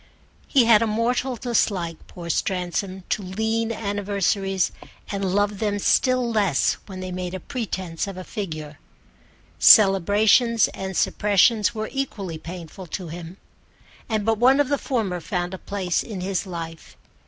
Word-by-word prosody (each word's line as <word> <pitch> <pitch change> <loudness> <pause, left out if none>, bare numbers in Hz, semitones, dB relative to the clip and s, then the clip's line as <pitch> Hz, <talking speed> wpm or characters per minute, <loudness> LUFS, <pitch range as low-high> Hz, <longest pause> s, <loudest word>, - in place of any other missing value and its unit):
He 265 -5 +4
had 225 -2 +6
a 230 - +2
mortal 240 +4 0
dislike, 200 -9 -1
poor 175 -1 -9
Stransom, 185 +2 -2
to - - 0
lean 220 +4 -1
anniversaries, 200 -3 -1 0.4
and 200 -1 -3
loved 205 -1 +1
them 205 -2 0
still 255 +4 +2
less 205 -10 +1
when 190 -2 -7
they 185 0 -5
made 180 0 -4
a - - -4
pretence 190 -6 -4
of 195 -2 -7
a 185 - -6
figure. 155 -8 -6 0.8
Celebrations 210 +3 +6
and 190 -1 -5
suppressions 210 +2 +3
were 215 0 -3
equally 200 - -4
painful 175 +2 -9
to 175 +1 -5
him, 170 +2 -8 0.7
and 215 -2 -1
but 225 -1 +1
one 260 +4 +5
of 285 -2 +2
the 285 -1 +1
former 210 -9 -2
found 180 0 -3
a 190 - -6
place 190 -4 -1
in 210 -5 -6
his 190 +1 -2
life. 165 -2 -8
200 Hz, 150 wpm, -23 LUFS, 180-220 Hz, 0.8 s, had